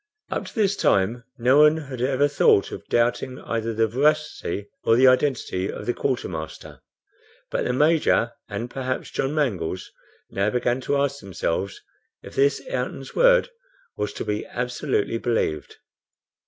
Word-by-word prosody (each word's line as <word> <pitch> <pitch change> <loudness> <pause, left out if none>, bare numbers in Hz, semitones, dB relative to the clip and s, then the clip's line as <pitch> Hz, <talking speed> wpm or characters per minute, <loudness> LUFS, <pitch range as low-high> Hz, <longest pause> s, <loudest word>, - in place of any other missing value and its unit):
Up - - -2
to - - -12
this 205 -3 +2
time 115 - +1
no 125 +4 +4
one 150 +1 +6
had 135 -5 -6
ever 135 +2 +2
thought 145 -8 +3
of - - -8
doubting 120 +2 0
either 115 0 -2
the 115 0 +2
veracity 135 - 0 0.2
or 115 - +4
identity 130 -6 +2
of - - -7
the 120 - 0
quartermaster; 90 - -4 0.7
but - - -1
the - - +1
Major, 150 -4 +3 0.2
and 105 +3 -4
perhaps 130 -1 -3
John 135 +3 -1
Mangles, 100 - -1 0.4
now 100 +2 +1
began 125 +2 0
to 140 - 0
ask 140 0 0
themselves 95 -1 -3 0.4
if - - -11
this 140 +1 +2
Ayrton's 130 +1 -4
word - - +5 0.4
was 105 - -2
to - - -5
be 105 0 -2
absolutely 125 -2 -1
believed. 115 - -1
125 Hz, 145 wpm, -24 LUFS, 110-140 Hz, 0.7 s, one